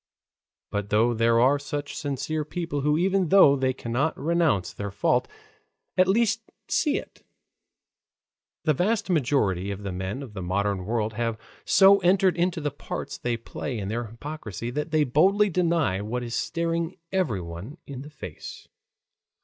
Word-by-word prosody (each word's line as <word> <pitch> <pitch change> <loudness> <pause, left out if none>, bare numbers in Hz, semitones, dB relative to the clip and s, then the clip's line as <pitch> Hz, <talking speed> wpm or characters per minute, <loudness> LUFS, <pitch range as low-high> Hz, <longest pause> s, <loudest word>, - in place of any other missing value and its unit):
But 100 0 -2
though 115 +3 +3
there 115 0 +3
are 135 +4 +4
such 145 0 -5
sincere 145 +2 -2
people 160 -1 -3
who 150 +2 +2
even 185 0 +2
though 185 -8 +7
they 130 -1 +1
cannot 130 +4 -1
renounce 155 - +1
their 100 0 -5
fault, 95 - +1 0.7
at 185 0 +4
least 225 +3 +2 0.3
see 295 -3 +1
it, - - -9 1.4
the 155 - +3
vast 205 +6 0
majority 120 - +1
of 100 0 -5
the 100 - -3
men 95 +8 -4
of 120 -6 -10
the 95 - -5
modern 95 +1 -1
world 110 -1 -1
have 115 0 -2 0.3
so 195 +1 +6
entered 185 -1 +3
into 175 0 0
the 145 -2 -2
parts 145 - -6
they 120 -1 -1
play 120 +2 -5
in 100 -2 -4
their 120 +2 -2
hypocrisy 115 -1 -6
that 150 +5 -3
they 155 -1 +3
boldly 190 +10 +3
deny 165 - +1
what 120 +4 -3
is 120 -1 -5
staring 170 +3 -1
everyone 105 - -3
in 135 -2 -7
the 145 - -9
face. 150 - -9
140 Hz, 155 wpm, -26 LUFS, 110-170 Hz, 1.4 s, though